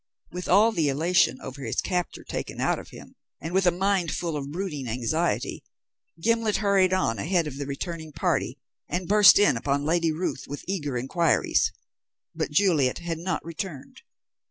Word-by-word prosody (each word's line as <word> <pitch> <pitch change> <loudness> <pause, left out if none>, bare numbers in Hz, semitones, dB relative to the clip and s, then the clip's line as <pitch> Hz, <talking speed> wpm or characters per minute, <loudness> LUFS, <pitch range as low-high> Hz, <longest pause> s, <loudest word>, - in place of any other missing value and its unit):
With 180 0 -6
all 210 +5 +5
the 160 -8 +1
elation 150 -3 +2
over 135 +2 -8
his - - -2
capture 180 -2 -2
taken - - -5
out - - +1
of - - -11
him, - - -13 0.3
and 165 +2 -6
with 190 -1 +3
a - - +6
mind 190 -1 0
full 170 -3 -3
of 140 -1 -4
brooding 155 -6 -4
anxiety, 125 +9 -1 0.6
Gimblet 230 +2 +1
hurried 195 -2 +3
on 185 - 0
ahead 170 - +1
of 140 -3 -6
the 140 - -4
returning 160 +2 -5
party, - - -1 0.3
and 175 0 -2
burst 205 -1 +7
in 160 -10 +4
upon 140 +3 -1
Lady 165 +1 +2
Ruth 155 -4 -3
with 145 - -7
eager 145 -9 -2
inquiries. 160 +7 +1 0.6
But - - -2
Juliet 150 -6 +2
had 170 -2 -4
not 170 -3 -3
returned. 165 -3 -7
170 Hz, 170 wpm, -26 LUFS, 145-185 Hz, 0.6 s, burst